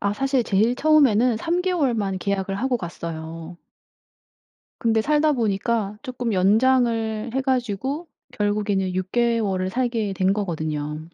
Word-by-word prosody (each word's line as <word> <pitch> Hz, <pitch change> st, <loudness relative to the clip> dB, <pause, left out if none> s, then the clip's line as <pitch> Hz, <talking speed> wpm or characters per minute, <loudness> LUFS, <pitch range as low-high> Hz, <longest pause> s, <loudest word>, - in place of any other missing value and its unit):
아 200 Hz, 0 st, 0 dB
사실 270 Hz, +1 st, +1 dB
제일 220 Hz, +3 st, +2 dB
처음에는 255 Hz, -6 st, +4 dB
3 340 Hz, +8 st, -1 dB
개월만 250 Hz, -, 0 dB
계약을 195 Hz, 0 st, -2 dB
하고 250 Hz, +4 st, 0 dB
갔어요. 165 Hz, -1 st, -7 dB, 1.2 s
근데 225 Hz, -2 st, +2 dB
살다 300 Hz, +3 st, +2 dB
보니까 215 Hz, -3 st, -1 dB
쪼끔 245 Hz, -2 st, -3 dB
연장을 225 Hz, +2 st, +2 dB
해 265 Hz, -, +1 dB
가지고 260 Hz, -, -2 dB, 0.2 s
결국에는 205 Hz, -4 st, -1 dB
6 185 Hz, +1 st, -3 dB
개월을 225 Hz, -6 st, +1 dB
살게 230 Hz, -3 st, -1 dB
된 190 Hz, +1 st, +2 dB
거거든요. 155 Hz, -6 st, -3 dB
220 Hz, 270 characters per minute, -23 LUFS, 195-250 Hz, 1.2 s, 처음에는